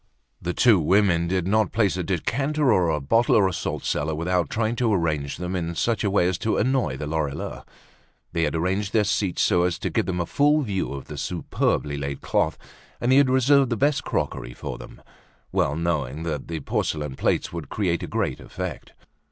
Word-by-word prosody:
The 90 +1 -3
two 115 -6 +5
women 85 0 +3
did 90 -1 0
not 105 -1 +2
place 100 -4 +2
a 90 - -2
decanter, 130 - +1
or 90 -4 +3
a 75 - +1
bottle, 115 - +3
or 100 -3 +5
a 95 - -2
salt - - -4
cellar, 75 +1 -1
without 90 +2 0
trying 110 +1 0
to 120 -2 +2
arrange 75 -7 0
them 90 +1 -4
in 85 -1 -3
such 115 +6 0
a 100 - +2
way 95 -3 +3
as 90 -1 -1
to 110 - 0
annoy 125 - +1
the 75 - -4
Lorilleuxs. 75 -2 -3 0.7
They 85 - 0
had 75 - -2
arranged 95 +5 -1
their 110 - +4
seats 100 -2 0
so 90 - +3
as 90 0 +1
to - - -3
give - - 0
them 90 -2 -1
a 85 - 0
full 145 - +3
view 100 - -2
of 70 -1 -6
the - - -7
superbly 70 -1 -1
laid 70 -1 -4
cloth, - - 0 0.4
and 120 - +1
they 130 - +6
had 140 -2 +5
reserved 130 +1 +4
the 115 - -1
best 140 +2 +2
crockery - - -3
for - - -6
them, - - -12 0.5
well 75 - +1
knowing 80 -3 -2
that 75 -4 -3
the 80 -2 -4
porcelain 75 0 -2
plates - - 0
would 85 -5 -6
create 90 -5 0
a - - -4
great - - -2
effect. - - -7
90 Hz, 210 wpm, -24 LUFS, 80-110 Hz, 0.7 s, they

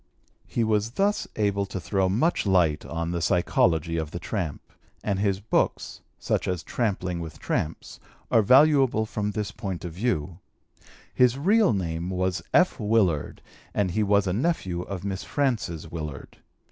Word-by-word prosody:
He 115 - 0
was 110 +1 0
thus 200 +5 +1
able 100 -2 0
to 95 - -5
throw 95 +2 0
much 120 - +1
light 85 -6 +3
on 85 0 -3
the 85 -1 -2
psychology 85 -1 +2
of 80 -2 -2
the 85 - -6
tramp, 85 -4 -4 0.4
and 100 -2 -1
his 100 -2 +1
books 105 - -1 0.2
(such - - -1
as 90 -4 -2
Tramping 95 - -2
with 80 -2 -7
Tramps) 80 +1 -3 0.3
are 115 - +6
valuable 135 -1 +5
from 105 -1 -3
this 105 -1 -3
point 95 -5 -5
of 85 - -6
view. 90 -4 -2 0.7
His 125 0 +4
real 205 +8 +4
name 85 -3 -2
was 95 0 -1
F. 180 -5 +3
Willard 105 -8 +1 0.3
and 100 -3 +1
he 110 - 0
was 100 -1 +3
a 90 - 0
nephew 100 - -1
of 95 0 -6
Miss 100 0 -3
Frances 115 - -2
Willard. 75 -4 -7
100 Hz, 160 wpm, -26 LUFS, 85-110 Hz, 0.7 s, are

